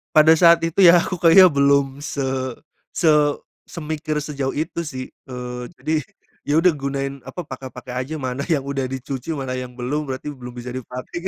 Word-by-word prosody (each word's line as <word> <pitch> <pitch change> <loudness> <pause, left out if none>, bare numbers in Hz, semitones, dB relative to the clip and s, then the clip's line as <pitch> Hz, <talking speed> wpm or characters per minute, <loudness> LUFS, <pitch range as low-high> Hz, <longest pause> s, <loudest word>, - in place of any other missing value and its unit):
Pada 155 +1 +7
saat 170 0 +7
itu 165 +2 -1
ya 175 +1 +8
aku 180 - -4
kayaknya 180 +3 +8
belum 140 0 +4
se 145 -1 -4 0.7
se 165 - +3 0.6
semikir 155 -2 -4
sejauh 140 -3 -3
itu 160 +3 -3
sih, 130 -3 -6 0.2
eee, 125 -1 -6
jadi, 155 - -3 0.5
ya 145 - +1
udah 170 +3 +5
gunain 140 -2 -3
apa, 175 +7 -6
pakai-pakai 130 -3 -9
aja 135 +5 -4
mana 130 -1 -4
yang 155 -6 +1
udah 135 -1 -2
dicuci 135 +3 -5
mana 135 -2 -4
yang 125 -1 -8
belum 140 +5 -3
berarti 130 +2 -5
belum 125 -3 -10
bisa 125 0 -7
dipakai. 130 +8 -6
140 Hz, 170 wpm, -21 LUFS, 130-155 Hz, 0.7 s, ya